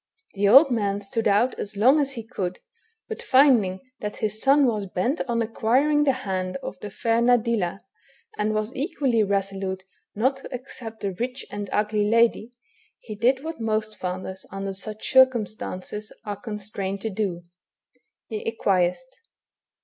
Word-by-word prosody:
The 200 0 +1
old 270 +6 +8
man 205 -4 0
stood 210 +3 -2
out 210 +5 +3
as 205 0 -6
long 260 +8 +5
as 275 -2 0
he 230 -4 -7
could, 185 -6 -4 0.5
hut 445 - -6
finding 245 -9 +4 0.2
that 210 0 -4
his 215 0 -1
son 275 +1 +5
was 215 -5 0
hent 245 - 0
on 235 -1 +1
acquiring 265 +7 +2
the 275 - +5
hand 185 -1 -2
of 190 - -5
the 210 - -6
fair 230 +3 0
Nadilla, 230 -6 +2 0.5
and 215 +1 0
was 215 +2 -2
equally 265 - 0
resolute 195 -2 -1 0.3
not 260 +6 +1
to 270 - -11
accept 245 -3 -8
the 195 -1 -2
rich 250 +7 -4
and 205 -1 -5
ugly 210 0 +1
lady, 230 0 +3 0.5
he 215 - -9
did 250 +6 +1
what 320 -5 -6
most 215 -1 -1
fathers, 185 0 -5
under 195 0 -4
such 215 +2 -5
circumstances, 215 -5 +1
are 205 -1 -3
constrained 200 -3 -4
to 220 - -3
do, 190 -4 -2 0.8
he 215 -2 -5
acquiesced. 195 +2 0
215 Hz, 155 wpm, -25 LUFS, 200-245 Hz, 0.8 s, old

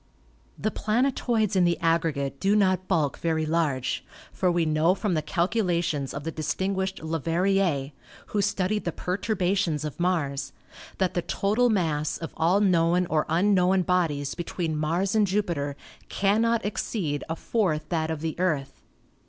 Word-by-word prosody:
The 215 - -1
planetoids 225 -1 0
in 185 - +4
the 175 -1 +2
aggregate 160 -5 0
do 200 +2 +2
not 185 -2 +2
bulk 155 -7 0
very 160 -1 0
large, 150 -5 0 0.3
for 180 -2 +1
we 170 -1 +1
know 155 +4 +3
from 205 -2 -1
the 155 - +1
calculations 170 -4 0
of 140 - -6
the 165 - -3
distinguished 190 +4 -2
Leverrier, 165 -1 0 0.4
who 205 - 0
studied 205 +1 0
the 170 - 0
perturbations 180 -4 -1
of 150 - -6
Mars, 155 -6 -1 0.4
that 190 -2 0
the 175 - 0
total 215 +8 +1
mass 160 -8 0
of 165 - -7
all 180 +5 +3
known 180 -2 +3
or 155 -1 +1
un 190 +5 +3
known 185 0 +3
bodies 165 -6 0
between 170 -2 -3
Mars 165 +6 0
and 215 -2 +3
Jupiter 170 -8 -1 0.3
cannot 225 +3 +1
exceed 170 -8 -2
a 165 - -1
fourth 160 -8 -1
that 160 -2 -1
of 160 -2 -3
the 160 -1 -2
Earth. 155 -7 -1
175 Hz, 150 wpm, -26 LUFS, 155-195 Hz, 0.4 s, in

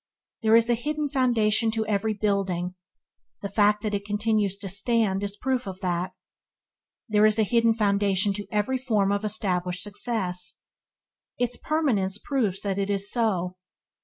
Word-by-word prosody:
There 220 0 +4
is 230 0 +5
a 240 - +3
hidden 295 +5 -2
foundation 230 -4 +2
to 220 - 0
every 215 +1 0
building; 195 -4 -1 0.7
the 200 - -3
fact 210 +1 +2
that 210 -1 -2
it 200 0 -1
continues 205 -1 0
to 200 - -5
stands 200 0 +1
is 200 0 -4
proof 255 -3 -1
of 190 -1 -6
that. 180 0 -2 0.9
There 215 -1 +4
is 215 0 +2
a 220 - +4
hidden 230 +1 +3
foundation 200 -2 +2
to 205 +1 -5
every 215 +5 0
from 215 -6 +1
of 200 +1 -1
established 185 -4 -1
success; 190 -5 -2 0.7
its 245 0 0
permanence 230 -12 0
proves 215 -7 -1
that 200 -1 -2
it 200 0 -1
is 200 0 +1
so. 185 -6 0
210 Hz, 160 wpm, -26 LUFS, 195-225 Hz, 0.9 s, is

